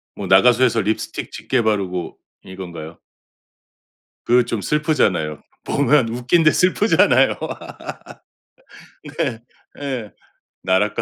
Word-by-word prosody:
뭐 100 Hz, -, -6 dB
나가수에서 115 Hz, +5 st, +4 dB
립스틱 110 Hz, +3 st, -3 dB
짙게 130 Hz, -3 st, -1 dB
바르고 95 Hz, -5 st, -2 dB, 0.3 s
이건가요? 85 Hz, -4 st, -9 dB, 1.3 s
그 125 Hz, 0 st, +4 dB
좀 115 Hz, -3 st, -3 dB
슬프잖아요. 95 Hz, -, 0 dB, 0.2 s
보면 140 Hz, -3 st, +2 dB
웃긴데 130 Hz, +8 st, +2 dB
슬프잖아요. 185 Hz, +4 st, +3 dB, 1.8 s
네. 120 Hz, -6 st, -1 dB, 0.4 s
예. 130 Hz, -7 st, -4 dB, 0.5 s
나락가 95 Hz, +3 st, +1 dB
115 Hz, 220 characters per minute, -20 LUFS, 95-130 Hz, 1.8 s, 나가수에서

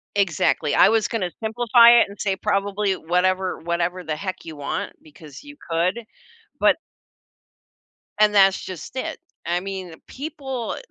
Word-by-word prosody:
Exactly, 165 Hz, -5 st, +1 dB
I 190 Hz, -, +6 dB
was 220 Hz, -1 st, +2 dB
gonna 190 Hz, -6 st, -2 dB
simplify 235 Hz, +1 st, +5 dB
it -, -, +4 dB
and 200 Hz, 0 st, -13 dB
say, 195 Hz, -2 st, 0 dB
"Probably 200 Hz, +1 st, -1 dB
whatever 185 Hz, +2 st, 0 dB
whatever 170 Hz, +2 st, -2 dB
the 155 Hz, -2 st, -3 dB
heck 185 Hz, +2 st, -6 dB
you 160 Hz, -2 st, -8 dB
want, 145 Hz, -1 st, -4 dB
because 150 Hz, -2 st, -14 dB
you 290 Hz, 0 st, -12 dB
could," 175 Hz, +7 st, 0 dB, 0.6 s
but -, -, +4 dB, 1.4 s
And 210 Hz, -1 st, +5 dB
that's 195 Hz, -1 st, +5 dB
just 185 Hz, -, -8 dB
it. 260 Hz, -, -4 dB, 0.3 s
I 175 Hz, +1 st, 0 dB
mean, 190 Hz, -3 st, -7 dB
people 265 Hz, -4 st, -5 dB
190 Hz, 145 wpm, -22 LUFS, 170-215 Hz, 1.4 s, I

